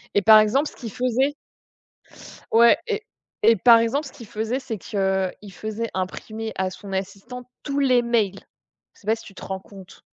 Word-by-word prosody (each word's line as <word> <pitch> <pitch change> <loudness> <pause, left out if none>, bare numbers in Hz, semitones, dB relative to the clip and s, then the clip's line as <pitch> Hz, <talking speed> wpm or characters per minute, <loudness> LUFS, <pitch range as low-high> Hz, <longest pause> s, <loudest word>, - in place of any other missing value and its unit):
Et 205 - +4
par 215 +1 +8
exemple, 260 +8 +2
ce - - -18
qu'il 230 -4 -7
faisait 255 +5 0 1.2
ouais 235 +1 +6
et 435 -2 -2 0.4
et 225 0 +7
par 235 0 +7
exemple, 235 +7 0
ce - - -10
qu'il 235 - -12
faisait, 220 +3 -2
c'est 235 -5 -5
qu'il 190 0 -2
faisait 220 +4 -4
imprimer, 215 +4 -4
à 190 0 -1
son 195 +1 -8
assistante, 195 +6 -6 0.2
tous 280 -1 -3
les 255 -3 +4
mails. 225 -5 0 0.5
Je - - -23
sais 210 - -20
pas 220 - +3
si 225 - -12
tu 195 - -13
te - - -10
rends 190 0 -4
compte? 195 -1 -14
220 Hz, 190 wpm, -23 LUFS, 195-245 Hz, 1.2 s, par